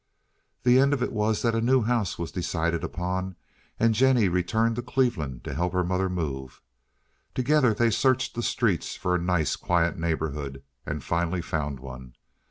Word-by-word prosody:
The 125 +1 +5
end 140 +1 +4
of 130 -3 0
it - - -2
was 105 0 0
that 115 -1 +2
a 115 - +1
new 125 +1 +3
house 115 -4 0
was 85 -1 -4
decided 85 -2 -1
upon, 90 +1 -3 0.4
and 115 0 +4
Jennie 125 -3 +4
returned 110 +6 +1
to - - -1
Cleveland 120 - -1
to - - -5
help 90 +2 -1
her 90 0 +2
mother 95 +1 0
move. 70 -8 -4 0.8
Together 130 -1 +3
they 115 +1 +3
searched 130 +4 +2
the 120 - -3
streets 110 -7 0
for 90 - -1
a 90 - +2
nice, 90 -4 +1
quiet 85 -1 0
neighborhood, 75 -4 -3 0.2
and 75 -2 -3
finally 85 +3 -1
found 75 -5 -3
one. 65 -2 -10
90 Hz, 175 wpm, -26 LUFS, 80-115 Hz, 0.8 s, The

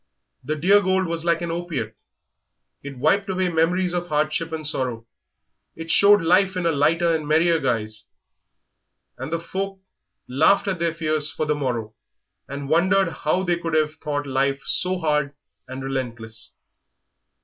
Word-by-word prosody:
The 155 - -2
dear 195 +7 +4
gold 190 0 +1
was 165 -1 -3
like 170 0 +1
an 170 - -2
opiate; 165 -11 -4 0.9
it 140 -2 -8
wiped 195 +9 +2
away 185 -1 0
memories 175 +2 +1
of 175 0 -2
hardship 155 +1 -1
and 160 -1 -4
sorrow, 125 -6 -2 0.7
it 165 0 -5
showed 205 -2 +6
life 185 +3 +3
in 180 - -2
a 165 - +3
lighter 165 +3 +2
and 155 -2 -3
merrier 165 +2 +3
guise, 110 -5 -2 1.1
and 130 +4 -5
the 165 - 0
folk 195 +3 -4 0.5
laughed 155 +11 +3
at 190 -3 -1
their 165 -1 0
fears 155 -2 0
for 155 - -3
the 150 - +1
morrow 120 -7 -3 0.5
and 140 0 -6
wondered 185 +4 +3
how 165 +3 -1
they 175 -2 0
could 165 -1 -2
have 155 -1 +2
thought 145 -2 -3
life 135 0 0
so 185 +1 +1
hard 150 -4 0 0.3
and 130 +1 -7
relentless. 115 -5 -4
160 Hz, 160 wpm, -23 LUFS, 140-175 Hz, 1.1 s, showed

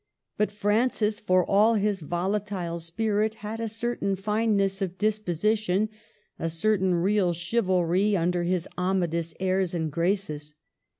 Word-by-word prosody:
But 210 - 0
Francis, 210 +1 +1
for 185 -3 +2
all 215 +3 +4
his 205 -1 +1
volatile 180 +1 -2
spirit, 215 +5 0
had 220 +2 -4
a 230 - -2
certain 225 -2 -1
fineness 200 -1 0
of 185 -1 -3
disposition, 215 0 0 0.5
a 165 - -1
certain 190 +2 +1
real 185 0 +2
chivalry 185 +1 +1
under 175 +1 +1
his 175 0 0
Amadis 170 -3 0
airs 185 -1 0
and 160 -2 -2
graces. 160 -3 -2
195 Hz, 125 wpm, -26 LUFS, 175-210 Hz, 0.5 s, all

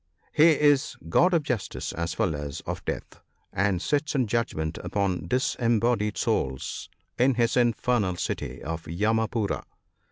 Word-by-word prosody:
He 155 0 +6
is 145 -1 +3
God 180 - +4
of 170 -4 +2
Justice 120 -9 -3
as 85 -1 -3
well 90 - +1
as 70 -1 -5
of - - -5
Death, - - -5 0.3
and 95 -1 +1
sits 145 - 0
in 130 -3 +3
judgment 100 -9 -1
upon 95 -5 -1
disembodied 115 - +1
souls 65 0 -1 0.3
in 130 +1 +4
his 120 0 +2
infernal 120 -5 +2
city - - -4
of 80 +3 -4
Yamapoora. 110 +4 0
110 Hz, 135 wpm, -26 LUFS, 90-125 Hz, 0.3 s, He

